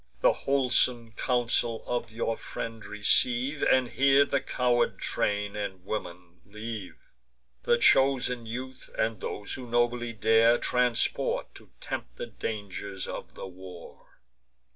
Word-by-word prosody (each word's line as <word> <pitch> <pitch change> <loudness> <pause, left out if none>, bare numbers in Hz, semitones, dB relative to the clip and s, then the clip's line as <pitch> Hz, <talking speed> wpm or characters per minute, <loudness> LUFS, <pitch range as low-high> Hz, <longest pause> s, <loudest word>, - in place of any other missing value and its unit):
The - - +5
wholesome 125 -3 +2
counsel 120 -1 0
of 120 -1 -2
your 115 0 -1
friend 115 -1 -6
receive, 125 +7 +1
And 130 -1 +3
here 140 +2 +4
the 140 - 0
coward 125 -1 +1
train 105 0 -1
and 95 -3 -5
woman 90 -4 -6
leave: 105 -1 -7 0.7
The 120 - +4
chosen 125 -1 +3
youth, 130 +3 -6
and 110 0 -1
those 100 - -4
who 125 -2 -7
nobly 120 0 +1
dare, 115 +2 +4
Transport, 125 -1 0
to - - -15
tempt - - -6
the - - -4
dangers 100 -2 -5
of - - -7
the - - -7
war. 90 -2 -12
115 Hz, 125 wpm, -28 LUFS, 105-125 Hz, 0.7 s, The